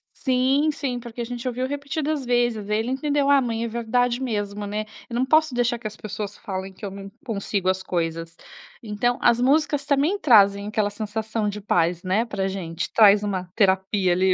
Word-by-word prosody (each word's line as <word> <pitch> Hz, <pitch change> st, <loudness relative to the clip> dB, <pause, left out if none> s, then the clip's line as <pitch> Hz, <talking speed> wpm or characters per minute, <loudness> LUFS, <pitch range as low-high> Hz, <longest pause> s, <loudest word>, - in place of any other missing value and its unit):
Sim, 265 Hz, +3 st, +2 dB
sim, 260 Hz, -4 st, -3 dB
porque 235 Hz, 0 st, -8 dB
a -, -, -1 dB
gente 245 Hz, +1 st, -5 dB
ouviu 250 Hz, +1 st, -2 dB
repetidas 285 Hz, +1 st, -3 dB
vezes, 240 Hz, -4 st, 0 dB
ele 220 Hz, +3 st, 0 dB
entendeu: 285 Hz, +1 st, 0 dB
"Ah 285 Hz, -1 st, +6 dB
mãe, 230 Hz, -2 st, -2 dB
é -, -, -1 dB
verdade 235 Hz, +2 st, 0 dB
mesmo, 205 Hz, -4 st, -3 dB
né. 210 Hz, +1 st, -3 dB, 0.2 s
Eu 235 Hz, -, -5 dB
não 250 Hz, +2 st, +1 dB
posso 310 Hz, 0 st, +3 dB
deixar 245 Hz, 0 st, 0 dB
que 225 Hz, -, -5 dB
as 210 Hz, -, -9 dB
pessoas 210 Hz, -1 st, -6 dB
falem 190 Hz, -1 st, -6 dB
que 205 Hz, -, -9 dB
eu 195 Hz, -, -5 dB
não 195 Hz, 0 st, -9 dB, 0.2 s
consigo 200 Hz, -4 st, -1 dB
as 190 Hz, 0 st, 0 dB
coisas." 165 Hz, -2 st, -3 dB, 0.5 s
Então 225 Hz, +3 st, 0 dB
as 240 Hz, 0 st, +4 dB
músicas 285 Hz, +2 st, +2 dB
também 295 Hz, +8 st, +1 dB
trazem 200 Hz, -, +5 dB
aquela 210 Hz, -1 st, 0 dB
sensação 215 Hz, +1 st, -3 dB
de 205 Hz, 0 st, -4 dB
paz, 175 Hz, -3 st, +1 dB
né, 195 Hz, +5 st, +1 dB
para 200 Hz, -4 st, -2 dB
gente, 175 Hz, -3 st, -4 dB
traz 210 Hz, -2 st, +6 dB
uma 190 Hz, -3 st, -2 dB
terapia 190 Hz, -2 st, +2 dB
ali, 185 Hz, +1 st, +3 dB
220 Hz, 195 wpm, -23 LUFS, 200-250 Hz, 0.5 s, Ah